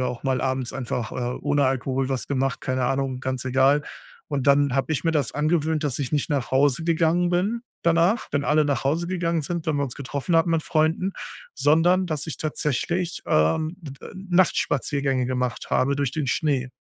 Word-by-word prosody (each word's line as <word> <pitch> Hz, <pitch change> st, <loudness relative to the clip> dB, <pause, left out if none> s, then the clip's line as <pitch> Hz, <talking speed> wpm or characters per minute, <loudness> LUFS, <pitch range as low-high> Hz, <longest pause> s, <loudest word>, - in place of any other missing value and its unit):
wir 125 Hz, -, 0 dB
auch 120 Hz, -1 st, -5 dB
mal 130 Hz, -2 st, 0 dB
abends 130 Hz, -1 st, -2 dB
einfach, 125 Hz, -3 st, -3 dB
äh, 125 Hz, 0 st, -3 dB
ohne 145 Hz, -1 st, +2 dB
Alkohol 130 Hz, 0 st, -1 dB
was 135 Hz, -2 st, -3 dB
gemacht, 135 Hz, -1 st, -1 dB
keine 130 Hz, -1 st, -1 dB
Ahnung, 135 Hz, -1 st, -1 dB
ganz 130 Hz, -1 st, -3 dB
egal. 135 Hz, +3 st, +3 dB, 0.5 s
Und 145 Hz, -2 st, -2 dB
dann 140 Hz, -1 st, +4 dB
habe 135 Hz, +3 st, 0 dB
ich 150 Hz, -, -1 dB
mir 165 Hz, -, +3 dB
das 145 Hz, -6 st, 0 dB
angewöhnt, 155 Hz, +1 st, 0 dB
dass 145 Hz, -3 st, -1 dB
ich 135 Hz, -1 st, -3 dB
nicht 150 Hz, +2 st, 0 dB
nach 135 Hz, -4 st, -1 dB
Hause 140 Hz, +3 st, +3 dB
gegangen 170 Hz, +1 st, +2 dB
bin 205 Hz, +7 st, 0 dB, 0.2 s
danach, 170 Hz, +7 st, +2 dB
wenn 145 Hz, -1 st, 0 dB
alle 150 Hz, +1 st, +3 dB
nach 135 Hz, -4 st, -1 dB
Hause 165 Hz, +5 st, 0 dB
gegangen 170 Hz, -2 st, -1 dB
sind, 170 Hz, +2 st, -4 dB
wenn 155 Hz, -2 st, +1 dB
wir 140 Hz, -, 0 dB
uns 125 Hz, -, -6 dB
getroffen 140 Hz, +4 st, -2 dB
hatten 165 Hz, +1 st, +3 dB
mit 165 Hz, -2 st, +1 dB
Freunden, 165 Hz, +4 st, +1 dB, 0.4 s
sondern 175 Hz, +5 st, +3 dB
dass 155 Hz, -3 st, -3 dB
ich 160 Hz, -, -4 dB
tatsächlich, 165 Hz, +3 st, -2 dB
ähm, 80 Hz, -, +2 dB
d 140 Hz, -5 st, -10 dB
äh, -, -, -11 dB
Nachtspaziergänge 145 Hz, -8 st, +1 dB
gemacht 125 Hz, -1 st, -3 dB
habe 140 Hz, +2 st, +2 dB
durch 140 Hz, -4 st, -1 dB
den 150 Hz, -3 st, -2 dB
Schnee. 135 Hz, -2 st, 0 dB
145 Hz, 195 wpm, -24 LUFS, 130-165 Hz, 0.5 s, dann